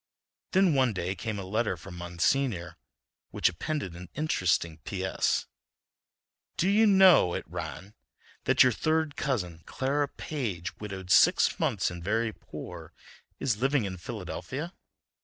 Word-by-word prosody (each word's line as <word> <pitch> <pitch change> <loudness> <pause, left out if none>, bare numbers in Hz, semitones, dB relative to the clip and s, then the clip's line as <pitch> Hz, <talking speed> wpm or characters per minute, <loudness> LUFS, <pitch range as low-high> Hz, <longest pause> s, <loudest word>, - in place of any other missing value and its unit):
Then 190 -3 +4
one 130 -4 +3
day 90 0 -2
came 110 0 -4
a 100 - -4
letter 105 -1 -1
from 90 +3 -10
Monsignor, 90 +3 -1 0.5
which - - +2
appended 95 - -4
an 90 0 -10
interesting 90 - 0
P. 95 +4 -4
S.: - - +1 1.1
"Do 180 - +2
you 215 +3 +5
know," 190 - +6
it - - -4
ran, 85 +3 -7 0.5
"that - - +6
your 130 - +4
third 155 +3 0
cousin, 90 - -2
Clara 145 +2 0
Page, 105 - -4
widowed 95 -3 -6
six - - +5
months - - +1
and 85 -1 -8
very 110 +3 0
poor, - - -9 0.5
is 120 -7 0
living 135 -3 +2
in 95 -1 -5
Philadelphia? 115 - -6
105 Hz, 140 wpm, -28 LUFS, 90-140 Hz, 1.1 s, know